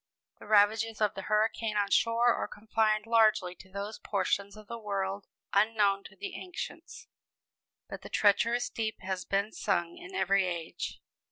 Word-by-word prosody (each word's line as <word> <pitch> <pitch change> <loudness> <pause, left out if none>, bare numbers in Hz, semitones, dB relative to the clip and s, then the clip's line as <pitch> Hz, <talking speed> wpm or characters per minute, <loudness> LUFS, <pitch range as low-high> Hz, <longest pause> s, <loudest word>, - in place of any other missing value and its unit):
The - - -12
ravages 215 +1 +3
of 210 -2 +2
the 195 - -6
hurricane 215 +1 0
on 200 -1 +1
shore 235 +1 +4
are - - -2
confined 215 0 0
largely 215 -5 +3
to 190 +1 -16
those 200 +3 -6
portions 200 +1 -1
of 215 - -12
the 235 +1 -6
world 195 -2 -3 0.3
unknown 200 -1 +3
to - - -12
the 395 -2 -6
ancients; 360 -1 -8 0.8
but - - -8
the - - -10
treacherous 230 +4 +3
deep 220 -1 -4
has 185 -1 -3
been 200 +2 0
sung 170 -4 -1
in 185 +1 -10
every 190 0 +2
age. 170 -2 -5
210 Hz, 160 wpm, -30 LUFS, 195-220 Hz, 0.8 s, shore